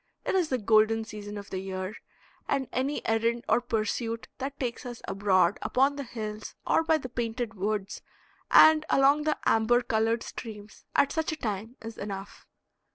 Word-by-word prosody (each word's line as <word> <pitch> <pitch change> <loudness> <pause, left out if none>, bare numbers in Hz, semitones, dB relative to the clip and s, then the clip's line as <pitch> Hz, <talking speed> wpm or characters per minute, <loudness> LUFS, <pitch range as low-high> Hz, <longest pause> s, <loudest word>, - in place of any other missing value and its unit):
It - - 0
is 365 -4 +2
the 255 - +1
golden 220 0 +3
season 210 -1 -7
of 200 - -9
the 185 - -2
year, 190 +1 -4 0.5
and 275 -2 0
any 270 +3 -1
errand 230 +1 +1
or - - +3
pursuit 230 0 -2
that 275 +2 -5
takes 245 -3 -3
us 240 -2 -7
abroad 190 -2 +2
upon 270 +3 +2
the 285 - -4
hills 215 -3 -6
or - - +3
by 320 0 +3
the 265 - -6
painted 235 -1 -3
woods 200 0 -3 0.5
and 315 -1 +7
along 280 +2 +4
the 305 - +1
amber 240 +2 +3
colored 225 0 +1
streams 210 -2 -9
at 280 - +4
such 320 0 -1
a - - -2
time 220 +2 -4
is 225 0 -8
enough. 195 -1 -7
225 Hz, 170 wpm, -28 LUFS, 210-260 Hz, 0.5 s, and